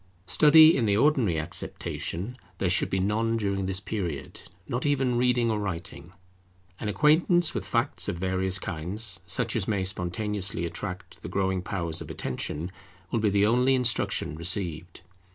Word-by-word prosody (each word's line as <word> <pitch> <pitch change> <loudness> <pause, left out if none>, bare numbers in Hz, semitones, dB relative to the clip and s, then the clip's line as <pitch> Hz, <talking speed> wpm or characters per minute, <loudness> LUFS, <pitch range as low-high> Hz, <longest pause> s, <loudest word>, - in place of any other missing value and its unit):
Study, 155 - +7
in 120 -5 +1
the 100 0 +2
ordinary 125 - +2
acceptation, 85 +6 -3 0.2
there 90 -1 0
should - - +2
be 95 - 0
none 110 +4 0
during 100 -3 -1
this 95 -1 0
period, 85 -10 -5 0.3
not 125 +1 -2
even 135 -4 +1
reading 120 -1 +2
or 110 - -1
writing. 85 -3 -5 0.7
An 105 - -3
acquaintance 155 - +3
with - - -4
facts 120 +4 0
of 100 -4 -2
various 95 +1 0
kinds, 95 +4 -1
such 110 +6 0
as 105 -4 -1
may 100 -3 0
spontaneously 95 0 -2
attract 90 +2 -6
the - - -7
growing 95 -1 0
powers 85 -4 -3
of - - -8
attention, 75 +6 -4 0.4
will 115 - +1
be 105 -1 +2
the 100 0 +3
only 125 +4 +3
instruction 125 -10 +1
received. 85 0 -1
100 Hz, 155 wpm, -27 LUFS, 90-120 Hz, 0.7 s, Study